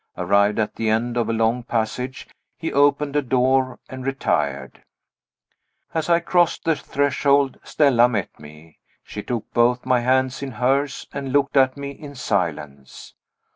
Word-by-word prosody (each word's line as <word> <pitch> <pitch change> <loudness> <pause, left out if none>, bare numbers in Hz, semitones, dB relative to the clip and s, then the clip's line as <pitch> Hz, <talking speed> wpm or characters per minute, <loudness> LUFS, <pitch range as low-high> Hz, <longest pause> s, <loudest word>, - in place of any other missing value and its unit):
Arrived 100 +3 +2
at 110 -1 -2
the 110 -1 0
end 115 +2 0
of 115 -2 0
a - - +2
long 115 +2 +1
passage, 120 +2 -3 0.3
he 165 - -4
opened 145 0 +2
a 145 - +3
door, 130 0 +1
and 130 0 -8
retired. 75 - -2 1.1
As 160 0 -2
I 170 0 +5
crossed 175 -1 +1
the 165 -1 +2
threshold 140 -1 +1
Stella 125 -5 +3
met 105 -5 -4
me. 75 +1 -15 0.2
She - - -7
took 115 -3 -5
both 120 +1 +2
my 130 -1 +3
hands 130 +2 +1
in 135 -2 -5
hers 135 +4 0
and 135 -1 -4
looked 140 0 +1
at 130 0 +3
me 140 0 -5
in 140 0 -11
silence. 75 - -4
130 Hz, 155 wpm, -22 LUFS, 110-140 Hz, 1.1 s, I